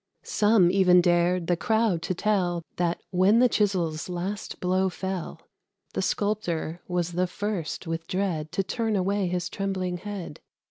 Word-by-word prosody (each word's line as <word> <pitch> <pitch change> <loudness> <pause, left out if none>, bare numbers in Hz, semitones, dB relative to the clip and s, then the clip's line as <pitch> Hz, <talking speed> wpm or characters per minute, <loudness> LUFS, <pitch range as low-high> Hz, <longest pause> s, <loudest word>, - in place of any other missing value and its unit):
Some 205 -4 +4
even 180 -2 +5
dared 175 0 +2
the 175 - +2
crowd 220 -2 +1
to 180 +2 -2
tell 180 -4 0
That, 175 -1 -1
when 190 +4 +4
the 250 +1 +6
chisel's 185 -8 0
last 180 +3 -4
blow 185 +1 +1
fell, 190 -1 -5 0.5
The - - -1
Sculptor 180 -6 -1
was 175 -1 -1
the 180 +1 0
first 195 -3 -4
with 165 0 -4
dread 175 -5 -2
To 195 - +1
turn 225 +2 -1
away 195 0 +1
his 175 0 -1
trembling 185 -1 -2
head. 190 -4 -7
180 Hz, 150 wpm, -26 LUFS, 175-200 Hz, 0.5 s, the